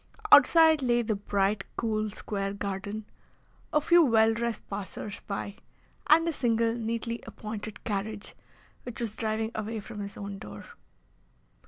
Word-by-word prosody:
Outside 315 +2 +7
lay 240 -2 +2
the 220 -1 0
bright, 200 0 0
cool, 215 -2 0
square 195 -1 -3
garden, 200 +2 -4 0.7
a 300 - +4
few 340 +3 +5
well 225 -4 +4
dressed 235 0 -3
passers 200 +1 -6
by, 200 0 -4 0.5
and 330 +2 +6
a 335 - 0
single, 230 -4 +1
neatly 230 0 -3
appointed 215 0 -7
carriage, 210 0 -4 0.5
which 245 - -8
was 225 -3 -3
driving 220 0 -1
away 220 +1 -3
from 210 +1 -9
his 200 0 -6
own 200 -1 -6
door. 105 0 -9
220 Hz, 140 wpm, -28 LUFS, 205-235 Hz, 0.7 s, Outside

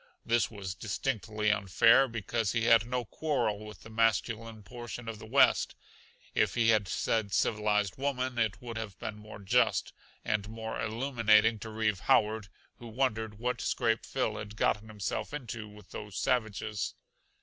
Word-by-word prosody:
This 120 0 +2
was 100 -4 -6
distinctly 110 +1 -1
unfair, 110 +6 +5
because 115 -2 -2
he 115 -1 +1
had 115 0 +5
no 125 -1 -2
quarrel 115 -7 -1
with 105 0 -10
the 115 - -11
masculine 115 0 0
portion 120 +2 -8
of 110 -2 -5
the 110 - -10
West. 135 +5 +4 0.6
If - - +2
he 115 -1 +3
had 110 -3 +3
said 105 +2 0
civilized 105 0 +1
woman 130 -3 -1
it 105 -3 0
would 115 -2 -6
have 105 -4 -5
been 110 +3 -5
more 105 0 -10
just 100 -1 +2 0.3
and 105 -1 -1
more 110 0 -5
illuminating 115 -2 +3
to 110 - -7
Reeve 110 -3 0
Howard 110 -1 +2 0.3
who 120 - -9
wondered 110 -3 -1
what 125 +2 -2
scrape 115 0 +1
Phil 115 -5 -1
had 105 0 -7
gotten 105 0 +1
himself 105 +6 -4
into 120 -6 -6
with 105 -1 -15
those 105 -2 -7
savages. 110 -4 -1
110 Hz, 160 wpm, -31 LUFS, 105-115 Hz, 0.6 s, unfair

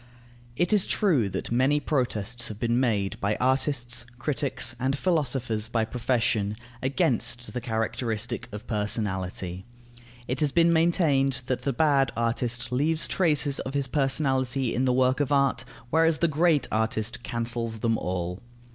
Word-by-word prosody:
It 175 - +1
is 205 -3 +3
true 150 - +2
that - - -5
many 130 +5 +3
protests 125 -5 -1
have 105 -1 -7
been 120 +1 +1
made 105 -6 0
by 105 +1 0
artists, 130 -2 0
critics, 135 -3 -1
and 135 +2 0
philosophers 130 - 0
by 115 -1 0
profession, 115 -4 0 0.3
against 125 -2 0
the 125 - -3
characteristic 115 0 -2
of 105 +2 -8
personality. 95 -4 -2 0.6
It 125 +2 -2
has 150 -2 +1
been 170 +1 +4
maintained 145 -6 +2
that 130 -1 -2
the 140 - 0
bad 140 -1 +3
artist 120 +1 -1
leaves 155 +5 +2
traces 150 -6 +1
of 135 +2 -5
his 140 -1 +1
personality 135 -2 +1
in 125 +3 +1
the 130 - +3
work 130 +1 +2
of 145 -1 0
art, 140 -1 +2 0.3
whereas 165 0 +3
the 170 - +2
great 155 -3 +2
artist 110 +1 -1
cancels 115 -2 -3
them 115 -1 +2
all. 90 0 -3
125 Hz, 145 wpm, -26 LUFS, 115-140 Hz, 0.6 s, been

